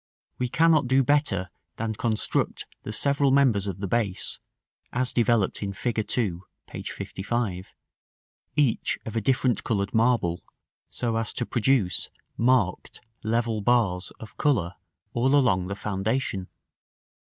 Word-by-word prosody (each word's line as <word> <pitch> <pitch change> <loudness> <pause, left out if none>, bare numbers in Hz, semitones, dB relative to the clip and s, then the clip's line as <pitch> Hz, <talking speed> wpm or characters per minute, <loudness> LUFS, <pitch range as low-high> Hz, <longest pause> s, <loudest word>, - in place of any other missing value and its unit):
We 125 -1 0
cannot 160 -1 +4
do 130 +1 +4
better 120 - +1 0.2
than 110 0 -2
construct 110 0 -1 0.2
the - - -6
several 140 +5 +2
members 130 -7 +3
of 95 0 -5
the 100 - -1
base, 100 -3 -1 0.5
as 125 +1 0
developed 115 -4 +2
in 100 -1 -3
Fig. 115 +3 -2 0.2
II., 100 -8 0 0.3
p. - - -7
55, 95 -2 -3 0.9
each 145 -6 +2
of 110 - -6
a 115 - +1
different 125 0 +1
colored 100 -3 -1
marble, 110 -7 +2 0.5
so 115 -2 -2
as 115 -1 0
to 120 - -2
produce 115 -7 +1 0.3
marked 115 -6 +1 0.2
level 115 0 0
bars 100 -5 +2
of 110 -3 -11
color 105 - +1 0.4
all 130 +4 +3
along 105 -10 +3
the 100 - -3
foundation. 100 0 -2
115 Hz, 130 wpm, -26 LUFS, 100-125 Hz, 0.9 s, cannot